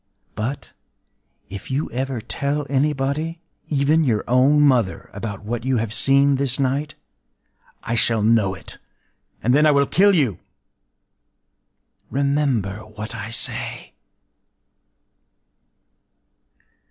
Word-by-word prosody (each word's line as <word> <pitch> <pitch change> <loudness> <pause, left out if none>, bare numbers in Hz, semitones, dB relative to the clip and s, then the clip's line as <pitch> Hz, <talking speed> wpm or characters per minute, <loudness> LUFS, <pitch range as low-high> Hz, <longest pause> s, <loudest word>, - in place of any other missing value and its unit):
But, 120 +6 -5 0.7
if 100 -1 -9
you 140 +4 -2
ever 130 0 -3
tell 140 +5 -2
anybody—even 150 +2 -1
your 115 -7 +1
own 130 +4 +4
mother—about 105 -5 0
what 115 +2 -4
you 130 -1 +1
have 110 -1 -2
seen 140 +2 +4
this 135 -1 0
night, 140 +3 -1 0.9
I 115 - -3
shall 115 -1 +2
know 105 -4 +2
it; 90 - -11 0.6
and 125 - +3
then 150 +3 +5
I - - +6
will 140 -1 +3
kill 200 +6 +4
you... 130 - +1 1.7
Remember 135 -8 0
what 110 0 -8
I 110 -1 -6
say! 115 - -4
130 Hz, 105 wpm, -21 LUFS, 110-140 Hz, 1.7 s, I